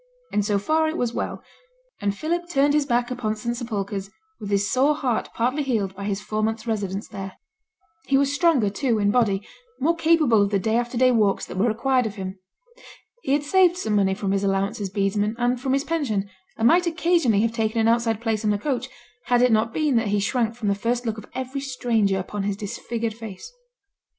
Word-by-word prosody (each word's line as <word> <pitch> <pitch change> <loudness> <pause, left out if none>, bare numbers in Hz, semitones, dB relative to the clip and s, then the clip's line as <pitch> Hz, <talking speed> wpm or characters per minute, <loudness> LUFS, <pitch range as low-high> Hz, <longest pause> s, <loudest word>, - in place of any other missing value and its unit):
And 210 - +2
so 205 0 +1
far 315 +10 +1
it 315 - -4
was 240 -1 -1
well; - - -4 0.6
and 200 0 -1
Philip 345 +5 -2
turned 285 -2 +3
his 295 -1 +2
back 240 -1 +1
upon 230 -4 -2
St 235 +2 -3
Sepulchre's 200 -5 -4 0.3
with 205 - -6
his 200 0 +1
sore 275 +5 +3
heart 255 -6 -1
partly 255 +6 0
healed 215 -9 -1
by 200 +1 -6
his 200 -1 -1
four 215 +1 -3
months' 220 +1 -1
residence 205 -3 -2
there. 195 -1 -7 0.7
He 275 - +3
was 280 0 +2
stronger, 285 - +3
too, 235 +2 0
in 205 -1 +2
body, 205 -4 +1 0.3
more 325 +5 +2
capable 315 -9 +4
of 200 - +2
the 200 - +1
day 220 +3 0
after 240 +1 -1
day 255 +1 +5
walks 210 -5 +2
that - - -9
were 195 +5 +2
required 250 +2 +1
of 210 - -7
him. 190 -1 -6 0.8
He 270 - 0
had 290 +1 +2
saved 360 +3 +4
some 215 - -1
money 190 -1 +2
from 195 -1 -2
his 195 0 0
allowance 195 +1 0
as 195 - -2
bedesman 205 +2 0
and 245 0 0
from 265 -1 0
his 275 +1 +1
pension, 270 -12 -1 0.3
and 225 - +3
might 350 +5 +4
occasionally 330 - +2
have 230 0 0
taken 225 0 0
an 225 - +3
outside 230 -1 +2
place 225 -2 -1
on 210 - +2
a - - 0
coach, 255 +1 -2 0.4
had 245 0 +3
it 250 - +4
not 220 +1 +2
been 295 -2 +1
that 225 -1 +1
he 205 0 +1
shrank 230 +2 0
from 225 -3 -4
the - - +3
first 235 +4 -1
look 220 -1 -2
of 215 - -12
every 260 +2 -4
stranger 235 -7 0
upon 200 +2 -4
his 195 0 -2
disfigured 225 +2 -4
face. 225 - -9
230 Hz, 220 wpm, -24 LUFS, 205-265 Hz, 0.8 s, day